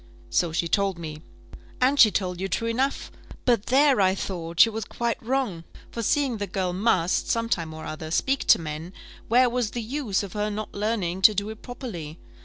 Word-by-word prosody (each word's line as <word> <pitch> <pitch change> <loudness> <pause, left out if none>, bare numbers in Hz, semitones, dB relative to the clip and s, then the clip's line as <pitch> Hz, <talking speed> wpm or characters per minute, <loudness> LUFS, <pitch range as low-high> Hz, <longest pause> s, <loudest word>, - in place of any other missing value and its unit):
"So 165 - +1
she 170 +1 0
told 195 0 +1
me." 155 -2 -7 0.6
"And 270 +3 +2
she 220 - +9
told 180 -2 -2
you 195 - -1
true 230 +4 -2
enough. 260 +4 -1 0.3
But 235 -4 +2
there, 270 -2 +4
I 190 0 +3
thought, 170 -4 -5
she 230 - +8
was 220 0 -4
quite 235 +1 -3
wrong; 235 -8 -1 0.3
for 230 - -4
seeing 260 +1 +1
the 205 -1 -3
girl 185 -1 -2
must, 185 -3 +1
some 230 0 +1
time 165 -8 -1
or 155 0 -8
other, 155 0 -6
speak 270 +11 0
to - - +6
men, 160 +3 -6 0.3
where 250 +2 +5
was 245 -2 -1
the 235 0 -4
use 230 -5 -1
of 195 - -7
her 210 0 -1
not 210 0 -5
learning 200 -4 -2
to 210 +2 +7
do 200 +2 -1
it 220 - -11
properly? 180 - -7
205 Hz, 205 wpm, -25 LUFS, 175-235 Hz, 0.6 s, she